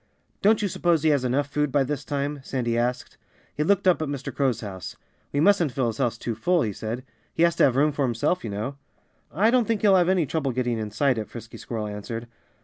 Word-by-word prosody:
"Don't 215 Hz, +1 st, +4 dB
you -, -, +2 dB
suppose 170 Hz, -3 st, +1 dB
he 155 Hz, -, +4 dB
has 140 Hz, -3 st, +2 dB
enough 130 Hz, +3 st, +1 dB
food 150 Hz, 0 st, -1 dB
by 140 Hz, 0 st, +3 dB
this 145 Hz, +1 st, -3 dB
time?" 145 Hz, +1 st, -2 dB
Sandy 120 Hz, -4 st, -1 dB
asked. 120 Hz, +1 st, -2 dB, 0.4 s
He 150 Hz, -, 0 dB
looked 195 Hz, +3 st, +2 dB
up 180 Hz, -3 st, +4 dB
at 155 Hz, -, -1 dB
Mr. 140 Hz, -2 st, -5 dB
Crow's 130 Hz, -5 st, +1 dB
house. 95 Hz, -5 st, -7 dB, 0.4 s
"We 140 Hz, -, 0 dB
mustn't 175 Hz, -3 st, +4 dB
fill 130 Hz, -, 0 dB
his 115 Hz, 0 st, -3 dB
house 120 Hz, -3 st, 0 dB
too 115 Hz, -, -3 dB
full," 170 Hz, +9 st, +1 dB
he 105 Hz, -3 st, -2 dB
said. 115 Hz, +5 st, -5 dB, 0.3 s
"He 165 Hz, -, +3 dB
has 170 Hz, -1 st, +3 dB
to -, -, +6 dB
have 130 Hz, -3 st, +2 dB
room 150 Hz, +3 st, +3 dB
for 145 Hz, -, -4 dB
himself, 125 Hz, +8 st, 0 dB
you 115 Hz, -, -4 dB
know." 110 Hz, +7 st, -4 dB, 0.5 s
"I 210 Hz, +9 st, +3 dB
don't 250 Hz, -2 st, +3 dB
think 225 Hz, -3 st, 0 dB
he'll 200 Hz, -2 st, +5 dB
have 180 Hz, -1 st, +4 dB
any 185 Hz, -4 st, +3 dB
trouble 140 Hz, -2 st, -1 dB
getting 120 Hz, -2 st, -1 dB
inside 110 Hz, +4 st, 0 dB
it," 110 Hz, -, -5 dB
Frisky 115 Hz, -1 st, -9 dB
Squirrel 110 Hz, -3 st, -4 dB
answered. 105 Hz, +3 st, -6 dB
140 Hz, 240 wpm, -25 LUFS, 120-160 Hz, 0.5 s, to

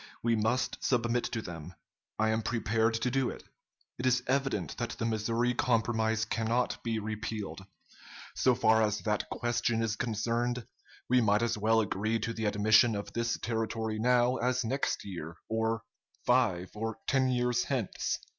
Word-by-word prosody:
We 115 Hz, 0 st, +3 dB
must 110 Hz, +4 st, 0 dB
submit 120 Hz, -1 st, +1 dB
to 115 Hz, -2 st, -3 dB
them. 85 Hz, 0 st, -8 dB, 0.4 s
I 110 Hz, 0 st, +2 dB
am 110 Hz, +1 st, +1 dB
prepared 115 Hz, 0 st, +1 dB
to 120 Hz, +2 st, 0 dB
do 135 Hz, -1 st, +1 dB
it. -, -, -8 dB, 0.6 s
It 125 Hz, -, 0 dB
is 125 Hz, 0 st, +3 dB
evident 135 Hz, +1 st, 0 dB
that 120 Hz, -, -2 dB
the 115 Hz, -, -2 dB
Missouri 115 Hz, +2 st, 0 dB
Compromise 110 Hz, -2 st, +1 dB
cannot 115 Hz, +2 st, 0 dB
be 115 Hz, -1 st, -1 dB
repealed. 110 Hz, -2 st, -4 dB, 0.7 s
So 130 Hz, -1 st, +3 dB
far 110 Hz, 0 st, +4 dB
as 105 Hz, -2 st, +1 dB
that 105 Hz, +2 st, -1 dB
question 120 Hz, -1 st, 0 dB
is 110 Hz, -2 st, 0 dB
concerned, 120 Hz, +2 st, -1 dB, 0.4 s
we 125 Hz, 0 st, +4 dB
might 105 Hz, 0 st, +3 dB
as 120 Hz, -, +1 dB
well 110 Hz, +2 st, +3 dB
agree 110 Hz, +2 st, 0 dB
to 115 Hz, +1 st, -3 dB
the 110 Hz, -1 st, -3 dB
admission 110 Hz, +2 st, +4 dB
of 100 Hz, -, -5 dB
this 115 Hz, 0 st, 0 dB
territory 110 Hz, -1 st, -2 dB
now 125 Hz, +2 st, +3 dB
as 125 Hz, 0 st, 0 dB
next 135 Hz, +5 st, -1 dB
year, 85 Hz, -4 st, -7 dB
or 110 Hz, 0 st, 0 dB, 0.4 s
five 110 Hz, -8 st, +2 dB
or 110 Hz, +1 st, -3 dB
ten 130 Hz, -1 st, +2 dB
years 125 Hz, -1 st, +1 dB
hence." 125 Hz, -8 st, -1 dB
115 Hz, 160 wpm, -30 LUFS, 110-120 Hz, 0.7 s, far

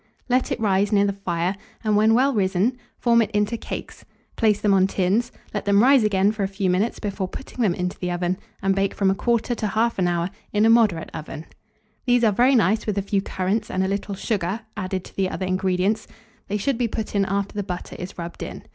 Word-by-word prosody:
Let 255 Hz, +1 st, +1 dB
it -, -, -1 dB
rise 200 Hz, -1 st, +2 dB
near 200 Hz, -1 st, +4 dB
the 200 Hz, -, 0 dB
fire, 180 Hz, -1 st, -2 dB, 0.3 s
and, 215 Hz, -1 st, +2 dB
when 220 Hz, +2 st, +4 dB
well 270 Hz, +3 st, +3 dB
risen, 200 Hz, +3 st, +1 dB, 0.2 s
form 235 Hz, -1 st, +4 dB
it 215 Hz, -, 0 dB
into 210 Hz, +2 st, +1 dB
cakes; -, -, -7 dB, 0.3 s
place 215 Hz, -3 st, +2 dB
them 205 Hz, -2 st, +2 dB
on 190 Hz, -1 st, +4 dB
tins, 200 Hz, +6 st, 0 dB, 0.2 s
let 205 Hz, -1 st, -3 dB
them 200 Hz, +1 st, +4 dB
rise 265 Hz, -2 st, +6 dB
again 200 Hz, -1 st, +3 dB
for 215 Hz, -1 st, -5 dB
a 195 Hz, -, +1 dB
few 195 Hz, -1 st, -1 dB
minutes 200 Hz, +6 st, 0 dB
before 200 Hz, -3 st, -3 dB
putting 255 Hz, +5 st, -7 dB
them 195 Hz, -7 st, +2 dB
into 180 Hz, 0 st, -3 dB
the 180 Hz, -, -2 dB
oven, 175 Hz, +1 st, -1 dB, 0.2 s
and 195 Hz, 0 st, +3 dB
bake 195 Hz, 0 st, 0 dB
from 195 Hz, -1 st, +2 dB
1/4 235 Hz, +4 st, +1 dB
to 240 Hz, -, -3 dB
1/2 215 Hz, -3 st, 0 dB
hour 175 Hz, +1 st, -1 dB, 0.2 s
in 210 Hz, +1 st, +3 dB
a 225 Hz, -, +6 dB
moderate 215 Hz, -8 st, +3 dB
oven. 155 Hz, 0 st, -7 dB, 0.6 s
These 245 Hz, -1 st, +4 dB
are 220 Hz, -, +5 dB
very 245 Hz, +6 st, +4 dB
nice 220 Hz, -1 st, +2 dB
with 205 Hz, -2 st, -1 dB
a 200 Hz, -, 0 dB
few 200 Hz, 0 st, 0 dB
currants 195 Hz, +3 st, -2 dB
and 185 Hz, -, 0 dB
a -, -, 0 dB
little 200 Hz, +1 st, -3 dB
sugar 200 Hz, 0 st, -2 dB
added 185 Hz, -2 st, -3 dB
to -, -, -14 dB
the 190 Hz, -1 st, 0 dB
other 185 Hz, -, -3 dB
ingredients: 185 Hz, +2 st, 0 dB, 0.4 s
they 205 Hz, -, -1 dB
should 240 Hz, +4 st, -1 dB
be 240 Hz, -, +2 dB
put 220 Hz, 0 st, -4 dB
in 200 Hz, -1 st, +2 dB
after 200 Hz, +1 st, -2 dB
the 205 Hz, -, -2 dB
butter 180 Hz, -3 st, -6 dB
is 180 Hz, -, -7 dB
rubbed 170 Hz, 0 st, -7 dB
in. -, -, -6 dB
200 Hz, 225 wpm, -23 LUFS, 185-220 Hz, 0.6 s, rise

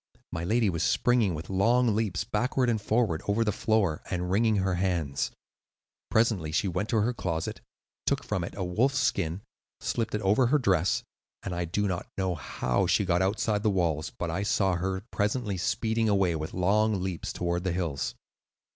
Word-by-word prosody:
My 85 Hz, -, -3 dB
lady 110 Hz, +5 st, +2 dB
was 85 Hz, -4 st, -1 dB
springing 120 Hz, -8 st, +2 dB
with 80 Hz, +1 st, -7 dB
long 115 Hz, +4 st, +3 dB
leaps 105 Hz, -5 st, 0 dB
backward 125 Hz, +2 st, +1 dB
and 110 Hz, -2 st, -1 dB
forward 105 Hz, -7 st, +1 dB
over 105 Hz, +3 st, +2 dB
the 105 Hz, -, +1 dB
floor, 100 Hz, -6 st, +1 dB
and 90 Hz, 0 st, -2 dB
wringing 110 Hz, +2 st, +3 dB
her 95 Hz, -2 st, +1 dB
hands. 85 Hz, -7 st, 0 dB, 0.8 s
Presently 110 Hz, -9 st, +2 dB
she 85 Hz, +5 st, +1 dB
went 95 Hz, +4 st, -2 dB
to 110 Hz, -3 st, +2 dB
her 120 Hz, +4 st, +1 dB
closet, 80 Hz, -7 st, -3 dB, 0.5 s
took -, -, +1 dB
from 90 Hz, -, -2 dB
it -, -, -6 dB
a 95 Hz, -, -2 dB
wolf's 120 Hz, +11 st, +1 dB
skin, 90 Hz, -, 0 dB, 0.4 s
slipped 115 Hz, -2 st, -2 dB
it 105 Hz, -, -2 dB
over 105 Hz, +6 st, +3 dB
her 145 Hz, +5 st, +4 dB
dress, 95 Hz, -, +2 dB, 0.4 s
and 95 Hz, -, -4 dB
I 85 Hz, 0 st, -1 dB
do 100 Hz, +5 st, 0 dB
not 90 Hz, -3 st, -3 dB
know 95 Hz, -2 st, 0 dB
how 65 Hz, -5 st, -1 dB
she 100 Hz, -, +2 dB
got 90 Hz, -1 st, +2 dB
outside 105 Hz, +2 st, +1 dB
the 110 Hz, -, +2 dB
walls, 85 Hz, -6 st, 0 dB
but -, -, -2 dB
I 95 Hz, -, -1 dB
saw 100 Hz, -2 st, +2 dB
her 95 Hz, +2 st, -2 dB
presently 105 Hz, -1 st, -1 dB
speeding 110 Hz, +5 st, 0 dB
away 95 Hz, -4 st, +2 dB
with 80 Hz, 0 st, -4 dB
long 100 Hz, +2 st, +2 dB
leaps 95 Hz, -3 st, -3 dB
toward 85 Hz, 0 st, -2 dB
the 95 Hz, -, 0 dB
hills." 85 Hz, -6 st, -2 dB
95 Hz, 185 wpm, -28 LUFS, 90-110 Hz, 0.8 s, her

